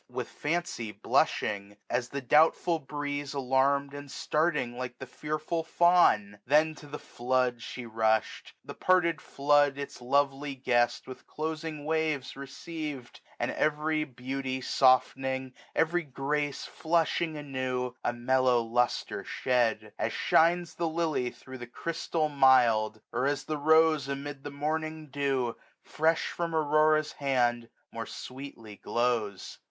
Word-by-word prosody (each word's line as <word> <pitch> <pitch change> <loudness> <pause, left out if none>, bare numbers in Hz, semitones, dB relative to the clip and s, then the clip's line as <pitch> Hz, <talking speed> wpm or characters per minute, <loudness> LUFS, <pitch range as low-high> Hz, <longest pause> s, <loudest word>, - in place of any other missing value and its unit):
With 125 -1 -5
fancy 150 -8 -3
blushing, 100 0 0
at 120 0 0
the 140 - -4
doubtful 160 +5 +3
breeze 145 -1 -4
Alarm'd, 140 +1 +1
and 145 0 -8
starting 150 -5 0
like 125 0 -5
the 130 - -7
fearful 155 +5 -3
fewn? 160 - +3
Then 155 +4 +3
to 150 -1 -13
the 145 +1 -6
flood 125 -2 -1
she 125 +1 -7
rushed; 110 -1 0
the - - -7
parted 175 -3 +2
flood 145 0 +2
1320 140 - -2
Its 140 - -10
lovely 140 +2 +1
guest 120 -2 +1
with 130 - -11
closing 155 -1 -4
waves 155 -4 -1
receiv*d 140 -1 -6
j - - -15 0.2
And - - 0
every 155 +1 0
beauty 130 -1 -4
foftening, 130 0 +2 0.2
every 170 +2 +2
grace 145 0 -2
Flushing 165 -1 0
anew, 130 -3 -3
a - - +1
mellow 125 +1 +2
lustre 120 +2 -1
shed: 120 -4 0
As - - 0
shines 170 0 +3
the 170 0 -1
lily 160 -6 0
thro' 130 +1 -11
the 120 -1 -8
chrystal 165 +3 -2
mild; 120 -6 +4
Or 125 +3 +1
as 145 0 -1
the 155 -1 -3
rose 160 -1 +4
amid 140 0 -5
the 145 - -5
morning 155 +1 -3
dewj 135 -4 0 0.3
1325 - - -21
Fresh 160 +1 +2
from 170 -1 -3
Aurora's 155 0 +3
hand, 120 -4 0 0.2
more - - -5
sweetly 125 -5 -9
glows. 115 -5 -2
140 Hz, 135 wpm, -29 LUFS, 125-155 Hz, 0.3 s, mild